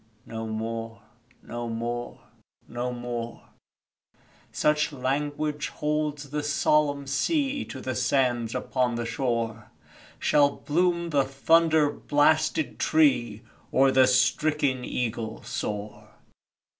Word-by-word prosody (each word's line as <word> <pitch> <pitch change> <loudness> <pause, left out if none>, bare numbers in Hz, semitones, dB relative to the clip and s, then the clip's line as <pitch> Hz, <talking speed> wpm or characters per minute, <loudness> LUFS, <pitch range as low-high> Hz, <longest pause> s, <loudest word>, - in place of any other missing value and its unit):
No 115 -1 -5
more 115 0 -5 0.4
no 120 0 -5
more 120 +1 -4 0.5
no 120 +1 -3
more 120 -1 -6 1.0
(Such 150 0 +1
language 145 +2 -2
holds 150 -2 -2
the 150 0 -1
solomn 145 -1 +1
sea 275 - 0
To 130 - -8
the 130 0 -3
sands 125 -2 +1
upon 125 -2 0
the 120 0 -2
shore) 115 -2 -2 0.5
Shall 145 -1 +4
bloom 170 +2 0
the 140 -2 +3
thunder 155 +3 +3
blasted 155 +2 +1
tree, 125 -8 +2 0.3
Or 135 0 +4
the 130 -1 +5
stricken 130 +1 +2
eagle 115 -3 -3
soar! 105 +1 -5
130 Hz, 105 wpm, -26 LUFS, 120-150 Hz, 1.0 s, the